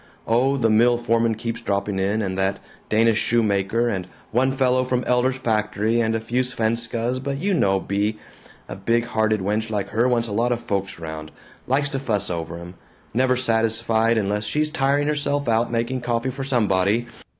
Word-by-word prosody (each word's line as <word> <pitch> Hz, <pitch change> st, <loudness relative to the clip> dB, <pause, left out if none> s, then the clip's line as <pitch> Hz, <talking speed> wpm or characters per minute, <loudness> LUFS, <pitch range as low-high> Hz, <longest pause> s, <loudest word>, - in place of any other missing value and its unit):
Oh, 130 Hz, +5 st, +2 dB
the 120 Hz, -4 st, +2 dB
mill 120 Hz, +2 st, +4 dB
foreman 115 Hz, -1 st, +1 dB
keeps 115 Hz, +1 st, -4 dB
dropping 100 Hz, 0 st, -1 dB
in, 100 Hz, +3 st, 0 dB
and 95 Hz, -1 st, -2 dB
that 95 Hz, +1 st, 0 dB, 0.3 s
Danish 110 Hz, 0 st, +3 dB
shoemaker, 110 Hz, 0 st, +1 dB
and 95 Hz, -6 st, -2 dB, 0.2 s
one 130 Hz, +3 st, +2 dB
fellow 130 Hz, -1 st, +2 dB
from 125 Hz, 0 st, -1 dB
Elder's 125 Hz, +1 st, +2 dB
factory, 110 Hz, -1 st, 0 dB
and 110 Hz, 0 st, +1 dB
a -, -, 0 dB
few 120 Hz, +3 st, -1 dB
Svenskas, 115 Hz, 0 st, -1 dB
but 140 Hz, 0 st, -3 dB
you 195 Hz, +7 st, 0 dB
know 95 Hz, -, +2 dB
Bea: 100 Hz, +3 st, -1 dB, 0.5 s
big 95 Hz, -, -9 dB
good 115 Hz, 0 st, +3 dB
hearted 110 Hz, -2 st, +1 dB
wench 105 Hz, +3 st, -1 dB
like 105 Hz, -3 st, -2 dB
her 115 Hz, +3 st, +2 dB
wants 120 Hz, -2 st, +1 dB
a -, -, -6 dB
lot 120 Hz, +4 st, +1 dB
of 120 Hz, -, 0 dB
folks 100 Hz, -4 st, -3 dB
around 80 Hz, -1 st, -7 dB, 0.4 s
likes 145 Hz, +3 st, +1 dB
to 135 Hz, -, -2 dB
fuss 105 Hz, -8 st, -1 dB
over 85 Hz, 0 st, -4 dB
'em 85 Hz, +1 st, -9 dB, 0.4 s
never 130 Hz, +2 st, +2 dB
satisfied 115 Hz, -1 st, +1 dB
unless 105 Hz, 0 st, 0 dB
she 150 Hz, +9 st, +1 dB
tiring 145 Hz, -1 st, +1 dB
herself 145 Hz, -2 st, -1 dB
out 115 Hz, +1 st, +1 dB
making 120 Hz, +2 st, -1 dB
coffee 120 Hz, +1 st, -1 dB
for 135 Hz, +1 st, -5 dB
somebody. 110 Hz, -4 st, +1 dB
115 Hz, 185 wpm, -23 LUFS, 105-125 Hz, 0.5 s, mill